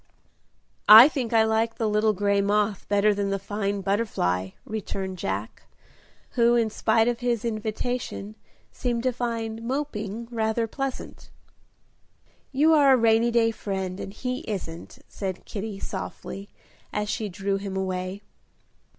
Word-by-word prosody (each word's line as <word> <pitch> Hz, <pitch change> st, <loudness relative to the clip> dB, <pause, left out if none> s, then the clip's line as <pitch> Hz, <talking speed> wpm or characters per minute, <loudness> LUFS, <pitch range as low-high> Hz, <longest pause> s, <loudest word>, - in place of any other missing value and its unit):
"I 220 Hz, +5 st, +12 dB
think 265 Hz, -7 st, -3 dB
I 225 Hz, -1 st, +5 dB
like 220 Hz, +1 st, +1 dB
the 225 Hz, -, -1 dB
little 215 Hz, +1 st, +2 dB
gray 200 Hz, 0 st, +1 dB
moth 205 Hz, 0 st, 0 dB
better 205 Hz, +1 st, +4 dB
than 200 Hz, 0 st, -1 dB
the 195 Hz, -, 0 dB
fine 200 Hz, 0 st, -3 dB
butterfly," 185 Hz, -, 0 dB, 0.2 s
returned 190 Hz, -3 st, -4 dB
Jack, 100 Hz, -, -4 dB, 0.7 s
who, 235 Hz, 0 st, +4 dB
in 230 Hz, -2 st, +2 dB
spite 225 Hz, +1 st, +2 dB
of 240 Hz, -1 st, 0 dB
his 240 Hz, -2 st, -1 dB
invitation, 220 Hz, -1 st, -3 dB, 0.4 s
seemed 240 Hz, -2 st, -2 dB
to 255 Hz, -1 st, +1 dB
find 230 Hz, -2 st, -3 dB
"moping" 230 Hz, -4 st, -3 dB
rather 225 Hz, 0 st, 0 dB
pleasant. 270 Hz, +3 st, -6 dB, 1.2 s
"You 300 Hz, +4 st, +4 dB
are 285 Hz, -3 st, +6 dB
a -, -, +5 dB
rainy 230 Hz, 0 st, +4 dB
day 230 Hz, -1 st, +3 dB
friend, 190 Hz, -3 st, -4 dB
and -, -, -6 dB
he 250 Hz, +4 st, -4 dB
isn't," 170 Hz, -5 st, -6 dB
said 190 Hz, -2 st, -5 dB
Kitty, 205 Hz, -1 st, -5 dB
softly, 195 Hz, +1 st, -6 dB, 0.4 s
as 210 Hz, 0 st, -2 dB
she 215 Hz, 0 st, -2 dB
drew 195 Hz, +1 st, -2 dB
him 195 Hz, -1 st, -5 dB
away. 185 Hz, +1 st, -3 dB
215 Hz, 140 wpm, -25 LUFS, 195-235 Hz, 1.2 s, I